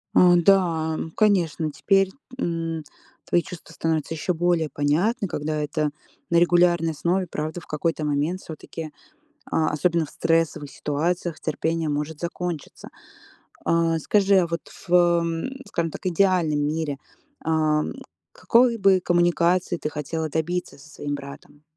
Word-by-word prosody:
А, 180 -1 +7
да, 170 -3 +3
м, 160 - -5
конечно, 170 -7 +2
теперь, 195 +7 +2 0.3
м, 165 -5 -2 0.4
твои 175 - +2
чувства 170 -2 -10
становятся 160 -1 -1
ещё 180 +3 -1
более 170 -2 +1
понятны, 180 - +1
когда 155 0 -3
это 150 0 -1 0.4
на 170 - +4
регулярной 175 -1 +4
основе. 175 +4 0
Правда, 155 +2 -4
в - - -17
какой-то 155 0 -1
момент 150 +6 -1
всё-таки, 160 0 -8 0.6
а, 155 - +2
особенно 165 +1 +1
в - - -15
стрессовых 165 -3 0
ситуациях, 165 +4 -2
терпение 160 -1 -1
может 150 +1 -3
закончиться. 170 -2 -5 0.8
А, 165 -1 +2
скажи, 200 +4 +3
а 175 - +3
вот 170 0 -3 0.3
в 175 - -2
м, 170 +3 +3 0.2
скажем 165 -1 -2
так, - - -9
идеальном 175 -4 +2
мире, 150 -1 -1 0.5
а, 155 -1 +2
м, - - -4 0.4
какой 235 0 +3
бы 195 -2 +4
коммуникации 175 0 +2
ты 150 - -3
хотела 155 +2 -3
добиться 165 +2 -2
со 145 +2 -16
своим 145 0 -4
братом? 140 +1 -11
165 Hz, 140 wpm, -24 LUFS, 155-175 Hz, 0.8 s, А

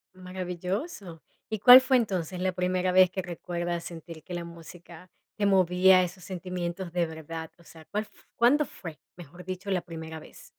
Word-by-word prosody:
Maravilloso. 185 - -5 0.3
¿Y 220 -2 -3
cuál 250 +3 +10
fue, 260 0 +3
entonces, 185 -6 -2
la 185 0 0
primera 180 0 0
vez 185 -1 +6
que 190 - -3
recuerdas 175 -1 -4
sentir 165 -2 -9
que 180 - -9
la 175 -1 -3
música, 170 +1 -12 0.3
te 205 - 0
movía 185 -1 +5
esos 180 0 -7
sentimientos 180 -1 -5
de 175 -1 +1
verdad?, 160 0 -7
o 170 - -20
sea, 160 0 -15
¿cuál 210 +1 -3
f - - -20 0.2
cuándo 275 +6 +4
fue, 160 - -10 0.2
mejor 175 +1 -12
dicho, 185 +2 -5
la 180 -2 +1
primera 160 -1 -8
vez? - - -15
180 Hz, 175 wpm, -27 LUFS, 170-190 Hz, 0.3 s, cuál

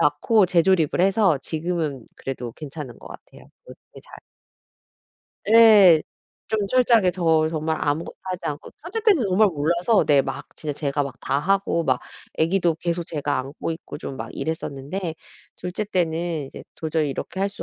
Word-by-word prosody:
낳고 170 +7 +3
재조립을 175 -2 +2
해서 190 -4 +3
지금은 160 -6 -3
그래도 125 -3 -6
괜찮은 145 -3 -8
것 - - -12
같아요. - - -14 0.2
어떻게 - - -15
잘. - - -13 1.3
예. 210 -8 +8 0.5
좀 215 -2 0
철저하게 230 -5 +4
더 160 -3 +2
정말 160 0 -2
아무것도 150 +3 -2
하지 185 -1 -5
않고 145 0 -5
첫째 375 +8 -4
때는 405 - +4
정말 200 +2 +4
몰라서 170 +7 +1
네 145 -2 +5
막 - - -6
진짜 150 -1 -4
제가 145 -1 0
막 140 -3 -5
다하고 170 +3 0
막 - - +1 0.3
애기도 170 +1 +1
계속 170 +1 -3
제가 145 -2 -2
안고 135 +5 -5
있고 160 - -8
좀 135 - -7
막 110 -1 -6
이랬었는데 160 +3 -4 0.4
둘째 180 +4 -4
때는 170 -5 -1
이제 - - -11
'도저히 160 -1 -1
이렇게 190 +7 -5
할 195 - +1
수 200 - -9
165 Hz, 320 characters per minute, -23 LUFS, 150-190 Hz, 1.3 s, 예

